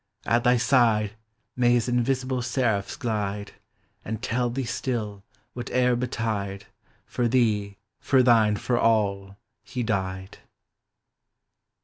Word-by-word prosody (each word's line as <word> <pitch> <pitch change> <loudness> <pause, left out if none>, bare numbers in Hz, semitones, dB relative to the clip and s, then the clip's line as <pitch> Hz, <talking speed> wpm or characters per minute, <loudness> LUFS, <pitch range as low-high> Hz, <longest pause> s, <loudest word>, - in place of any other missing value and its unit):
At 120 +1 +2
thy 125 0 +4
side 115 -4 +3 0.4
May 120 -1 +3
his 120 -1 +1
invisible 130 +1 0
seraphs 120 -5 -1
glide; 105 -6 -3 0.5
And 110 0 -4
tell 120 0 -1
thee 130 +3 -3
still, 110 -5 -3 0.3
whate'er 125 0 +1
betide. 110 -5 -3 0.4
For 120 -1 -1
thee, 105 -5 +1 0.2
for 130 -2 +3
thine, 110 -4 +4
for 120 +4 -1
all, 100 -3 +1 0.3
He 125 - -4
died! 95 -3 -3
115 Hz, 110 wpm, -25 LUFS, 105-125 Hz, 0.5 s, thy